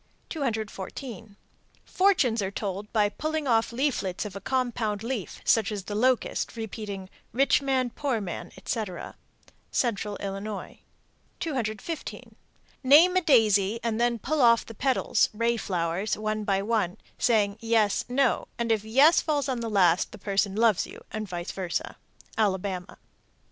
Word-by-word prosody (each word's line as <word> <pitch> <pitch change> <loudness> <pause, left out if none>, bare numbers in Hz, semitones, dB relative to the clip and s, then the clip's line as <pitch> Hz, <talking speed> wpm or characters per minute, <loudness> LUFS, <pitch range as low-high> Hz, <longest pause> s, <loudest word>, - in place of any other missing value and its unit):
214. 220 - -5 0.5
Fortunes 320 - +2
are 190 - -1
told 200 +1 -5
by 210 -2 +3
pulling 310 +6 -3
off 225 -2 +2
leaflets 235 -8 -1
of 200 -2 -7
a 195 - -6
compound 230 -4 -1
leaf, 230 -6 -4
such 220 -2 +3
as 205 -2 -4
the 205 - -6
locust, 250 +4 +1
repeating, 210 -3 -5 0.3
"Rich 275 +4 +3
man, 260 -3 0
poor 265 -4 -1
man," 190 -5 -6
etc. 190 -2 -4 0.5
Central 210 -4 -1
Illinois. 200 +1 -6 0.6
215. 270 - -4 0.5
Name 310 +8 +7
a 370 - +4
daisy, 220 - +4
and 230 -1 -1
then 240 0 +2
pull 295 +6 -1
off 235 -1 +5
the 225 - -9
petals 250 -1 +2
(ray 230 +2 +1
flowers) 180 -1 -1
one 215 0 -2
by 195 -1 +1
one, 210 -5 0 0.2
saying 205 -4 +2
"yes, 225 -3 +2
no," 255 0 +1
and 235 -1 -1
if 215 -2 +1
"yes" 270 +9 +5
falls 290 -3 0
on 255 -3 -1
the 230 -1 -3
last, 180 -4 +3
the - - -10
person 200 0 0
loves 220 -3 +3
you, - - -12
and 215 -2 -4
vice 175 -1 -4
versa. 185 -3 -3 0.4
_Alabama. 190 -3 -1
220 Hz, 145 wpm, -27 LUFS, 200-250 Hz, 0.6 s, Name